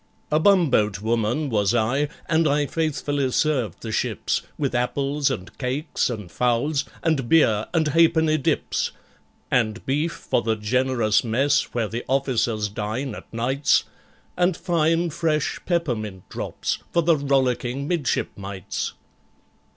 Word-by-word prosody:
A 150 - +4
bumboat 145 - +3
woman 115 +6 0
was 105 +1 +2
I, 130 +6 +1 0.2
and 160 0 +3
I 145 0 +2
faithfully 145 -3 -1
served 130 - 0
the 110 - -4
ships - - -1 0.2
With 140 -3 -1
apples 140 +3 0
and 90 - -5
cakes, 130 +4 -1
and 105 -7 -6
fowls, 125 - +1 0.2
and 145 -7 0
beer, 110 -10 +4
and 160 -3 +1
halfpenny 160 0 +4
dips, 135 - 0 0.6
And 115 -3 +1
beef 150 +5 0
for - - -1
the 110 -1 0
generous 115 0 +1
mess, 130 +5 +1
where 115 -3 +1
the 115 +4 -4
officers 120 -5 +1
dine 110 +6 -3
at - - -11
nights, 130 +5 +2 0.5
And 180 -1 +2
fine 165 0 +1
fresh 155 -2 0
peppermint 115 - -2
drops - - -3
for 170 - +2
the 165 0 +4
rollicking 135 -1 0
midshipmites. 100 - -2
135 Hz, 130 wpm, -23 LUFS, 115-155 Hz, 0.6 s, A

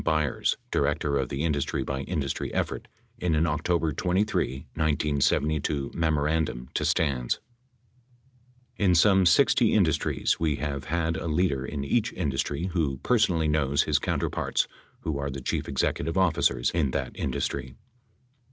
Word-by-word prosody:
Byers, 75 -4 +1
director 70 -1 0
of 65 - -2
the 70 +2 -3
industry 75 -4 0
by 70 -1 -3
industry 70 -3 -3
effort, - - -2 0.3
in 85 -3 +1
an 80 +2 +3
October 80 +1 0
23, 90 -6 0
i972, 75 -1 0
memorandum 75 -5 0
to - - -1
Stans: 65 -6 0 1.4
In 95 -4 +3
some 95 +1 +5
60 120 +4 +4
industries, 85 -8 +1
we 80 -3 +1
have 70 -1 -4
had 80 +1 -1
a 85 - -4
leader 75 -4 +1
in 70 0 -4
each 110 +11 +1
indus 70 -7 -1
try 75 +3 -4
who 75 -7 0
personally 90 -10 +2
knows 70 -2 +2
his - - +2
counterparts - - -1 0.3
who 75 -3 -2
are 70 0 -2
the 70 0 -5
chief 65 - -3
executive 75 +5 -1
officers 95 -4 +2
in 80 -5 +1
that - - -2
industry. 65 -1 -3
75 Hz, 140 wpm, -27 LUFS, 70-85 Hz, 1.4 s, some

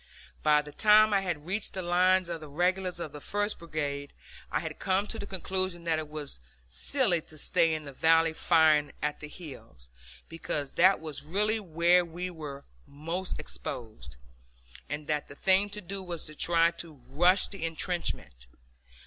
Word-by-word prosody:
By 150 -1 +4
the 150 - -10
time 215 +3 +5
I 195 - +3
had 170 -6 -3
reached 195 +4 -1
the 185 - -4
lines 180 +1 +3
of 170 -2 -5
the 155 - -8
regulars 180 +3 0
of 160 -3 -5
the 150 - -10
first 205 +5 -2
brigade 145 -4 -4 0.4
I - - +1
had - - -6
come 190 +2 +1
to 225 +1 -4
the 200 - -6
conclusion 185 -2 -2
that 165 -2 +1
it 155 -1 -6
was 150 - -6 0.3
silly 180 - +1
to 155 - -11
stay 160 +2 +3
in 155 -1 -6
the 140 - -9
valley 165 +2 +4
firing 155 -3 +3
at 150 0 -1
the 150 - -7
hills, 140 - -12 0.4
because 150 -3 -3
that 185 +3 +4
was 150 -3 -5
really 210 +8 +1
where 175 -1 +3
we 175 +2 -5
were 145 -4 -8 0.2
most 165 +6 -4
exposed, 75 - -7 0.7
and 150 +1 -4
that 150 -1 -2
the 140 - -12
thing 190 +5 +3
to 210 +1 -2
do 195 +2 -5
was 175 -3 -5
to 155 - -5
try 165 +2 +3
to 165 -4 -7
rush 175 +6 +4
the 195 -4 -7
intrenchments. 160 - -2
165 Hz, 175 wpm, -29 LUFS, 150-185 Hz, 0.7 s, time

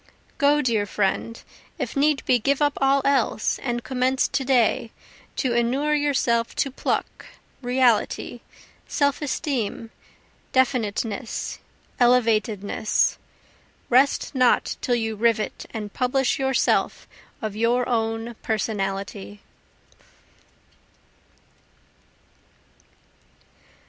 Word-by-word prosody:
Go, 295 0 +4
dear 220 -4 +1
friend, 210 +3 -1 0.4
if - - -4
need 290 0 +2
be 250 - +3
give 275 +5 +1
up 290 -1 +2
all 270 0 +3
else, 270 -5 +1
and 240 -2 -3
commence 260 0 +1
to 270 - -1
day 240 -3 +2 0.4
to 255 -4 0
inure 255 +6 +1
yourself 265 -6 +1
to 275 - 0
pluck, - - -3 0.3
reality, 245 -1 +1 0.5
self 285 -1 0
esteem, 250 -6 -3 0.6
definiteness, 230 -3 -1 0.4
elevatedness, 220 -4 +2 0.7
Rest 265 +5 +3
not 255 -2 +2
till 245 - +1
you 225 -2 -2
rivet 220 0 0
and 210 -3 -6
publish 260 +1 +1
yourself 265 -1 +1 0.3
of 215 -3 -4
your 235 +3 +1
own 225 0 -1
Personality. 195 - -3
240 Hz, 90 wpm, -24 LUFS, 225-270 Hz, 0.7 s, Go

